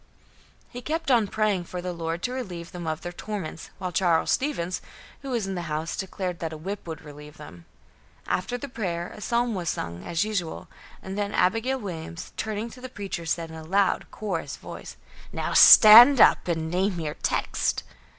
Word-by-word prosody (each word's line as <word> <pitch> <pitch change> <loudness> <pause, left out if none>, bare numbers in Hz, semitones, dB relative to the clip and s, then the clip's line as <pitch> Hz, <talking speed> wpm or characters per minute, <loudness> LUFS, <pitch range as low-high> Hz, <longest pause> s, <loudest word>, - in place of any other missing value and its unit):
He 245 - -9
kept 310 +1 -2
on 230 -4 +4
praying 205 -4 0
for 180 - -6
the 180 0 -4
Lord 165 0 -4
to 245 - -1
relieve 185 -10 -6
them 175 -2 -7
of 155 0 -3
their 175 - -5
torments, 180 -4 -6
while 185 -1 -4
Charles 170 -2 +2
Stevens, 185 - -1 0.4
who 275 - -7
was 235 -5 -1
in 195 - -4
the 175 -3 -5
house, 155 +2 -3
declared 185 -2 -4
that 165 -1 -4
a 160 - -7
whip 190 +4 -6
would 160 -1 -7
relieve 150 0 -12
them. 85 +2 -12 0.6
After 245 +7 -2
the 280 - -7
prayer, 180 -9 -4
a - - -11
psalm 235 +2 0
was 175 -5 -2
sung, 85 +1 -4
as 170 +4 -1
usual, 195 -7 -3 0.4
and 190 +2 -5
then 205 0 -2
Abigail 225 +8 +1
Williams, 175 -5 -7
turning 220 +1 -4
to 250 - -13
the 255 - -7
preacher, 195 -7 -6
said 165 0 -2
in - - -9
a 160 - -8
loud, 195 +4 +1
coarse 210 -3 -4
voice: - - -10 0.3
"Now - - -3
stand 240 +5 +10
up - - +5
and 160 -2 -2
name 185 0 0
your 155 -2 -3
text!" - - -1
185 Hz, 190 wpm, -25 LUFS, 165-215 Hz, 0.6 s, stand